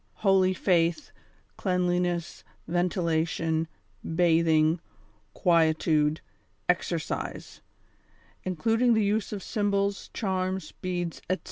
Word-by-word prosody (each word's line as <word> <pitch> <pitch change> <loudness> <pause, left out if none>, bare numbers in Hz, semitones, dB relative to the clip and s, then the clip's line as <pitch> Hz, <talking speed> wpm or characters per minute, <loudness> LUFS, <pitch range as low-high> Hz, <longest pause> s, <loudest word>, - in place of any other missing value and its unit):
holy 190 -1 +5
faith, 175 - +1 0.5
cleanliness, 180 -2 -1 0.2
ventilation, 165 -2 0 0.4
batiiing, 165 -1 +3 0.6
quietude, 160 -2 +2 0.5
exercise; - - -2 0.8
including 225 +6 +2
the 220 -2 +2
use 210 +2 0
of 200 -3 -5
symbols, 200 -1 -1
charms, 185 -4 -2
beads, 175 -2 -4
etc. 185 - +1
180 Hz, 80 wpm, -27 LUFS, 165-195 Hz, 0.8 s, holy